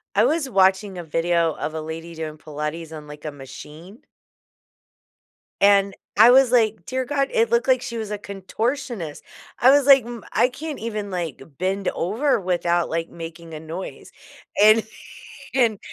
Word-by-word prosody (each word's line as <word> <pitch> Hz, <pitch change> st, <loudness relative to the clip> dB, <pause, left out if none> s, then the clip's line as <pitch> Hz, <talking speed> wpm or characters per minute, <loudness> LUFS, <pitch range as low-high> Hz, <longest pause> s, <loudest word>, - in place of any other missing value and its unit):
I -, -, +5 dB
was 310 Hz, -3 st, 0 dB
watching 190 Hz, -1 st, +2 dB
a 175 Hz, -, -6 dB
video 165 Hz, 0 st, +1 dB
of 155 Hz, -, -4 dB
a 160 Hz, -, -4 dB
lady 165 Hz, +2 st, -7 dB
doing 155 Hz, -1 st, -6 dB
Pilates 150 Hz, +2 st, -6 dB
on, 150 Hz, -1 st, -9 dB
like, 150 Hz, +1 st, -11 dB
a 155 Hz, -, -3 dB
machine 150 Hz, -, -12 dB, 1.6 s
and 200 Hz, -1 st, +4 dB, 0.2 s
I 225 Hz, +3 st, +9 dB
was 260 Hz, -1 st, +5 dB
like, 220 Hz, -6 st, +2 dB
"Dear 260 Hz, 0 st, -2 dB
God," 275 Hz, +1 st, 0 dB
it 465 Hz, -1 st, +2 dB
looked 470 Hz, -, +1 dB
like 255 Hz, -1 st, +3 dB
she 235 Hz, -, -5 dB
was 215 Hz, -2 st, -5 dB
a 210 Hz, -, -3 dB
contortionist, 205 Hz, -, -4 dB, 0.4 s
I 255 Hz, -, +6 dB
was 285 Hz, -1 st, +4 dB
like, 270 Hz, -4 st, +7 dB
"M 235 Hz, -2 st, -8 dB
I 240 Hz, +3 st, +3 dB
can't 295 Hz, +4 st, -7 dB
even, 210 Hz, -3 st, -4 dB
like, 170 Hz, -7 st, -4 dB, 0.2 s
bend 195 Hz, +1 st, -1 dB
over 225 Hz, -, 0 dB
without, 175 Hz, -2 st, 0 dB
like, 165 Hz, 0 st, -2 dB
making 165 Hz, 0 st, -9 dB
a 155 Hz, -, -7 dB
noise," 165 Hz, +4 st, -8 dB, 0.5 s
and 215 Hz, +1 st, +7 dB, 0.7 s
and 235 Hz, -6 st, +2 dB
195 Hz, 165 wpm, -23 LUFS, 165-240 Hz, 1.6 s, I